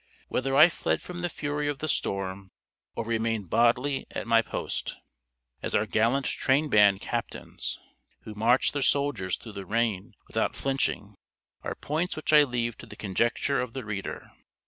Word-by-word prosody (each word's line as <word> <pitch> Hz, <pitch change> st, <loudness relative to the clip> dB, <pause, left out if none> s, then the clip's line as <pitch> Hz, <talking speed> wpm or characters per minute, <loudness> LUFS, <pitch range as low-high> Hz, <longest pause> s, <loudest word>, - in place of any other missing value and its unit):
Whether 135 Hz, +1 st, 0 dB
I 155 Hz, +4 st, +9 dB
fled 175 Hz, -, -1 dB
from 175 Hz, 0 st, -8 dB
the 175 Hz, -, -1 dB
fury 145 Hz, -1 st, -2 dB
of 145 Hz, -1 st, -1 dB
the 155 Hz, -, -4 dB
storm, 95 Hz, -6 st, -2 dB, 0.5 s
or 115 Hz, -, -3 dB
remained 115 Hz, -4 st, -1 dB
bodly 125 Hz, +4 st, +2 dB
at -, -, -5 dB
my 115 Hz, -1 st, +5 dB
post, -, -, -4 dB, 0.7 s
as -, -, -2 dB
our 110 Hz, -, +3 dB
gallant 115 Hz, +6 st, +2 dB
train 145 Hz, +3 st, +1 dB
band 100 Hz, -3 st, +5 dB
captains, -, -, -4 dB, 0.4 s
who 110 Hz, -, -9 dB
march 115 Hz, +5 st, +3 dB
their 145 Hz, -, -2 dB
soldiers 135 Hz, -10 st, +1 dB
through 115 Hz, -, -10 dB
the 100 Hz, -1 st, -6 dB
rain 110 Hz, -1 st, -1 dB
without -, -, -1 dB
flinching, 135 Hz, -6 st, -1 dB, 0.5 s
are -, -, -4 dB
points 160 Hz, +5 st, -2 dB
which 155 Hz, 0 st, -2 dB
I 150 Hz, -1 st, +8 dB
leave 120 Hz, -3 st, -2 dB
to -, -, -10 dB
the -, -, -10 dB
conjecture 120 Hz, +7 st, 0 dB
of 125 Hz, -2 st, -5 dB
the 130 Hz, -3 st, -5 dB
reader. 100 Hz, -2 st, -5 dB
120 Hz, 170 wpm, -27 LUFS, 105-140 Hz, 0.7 s, I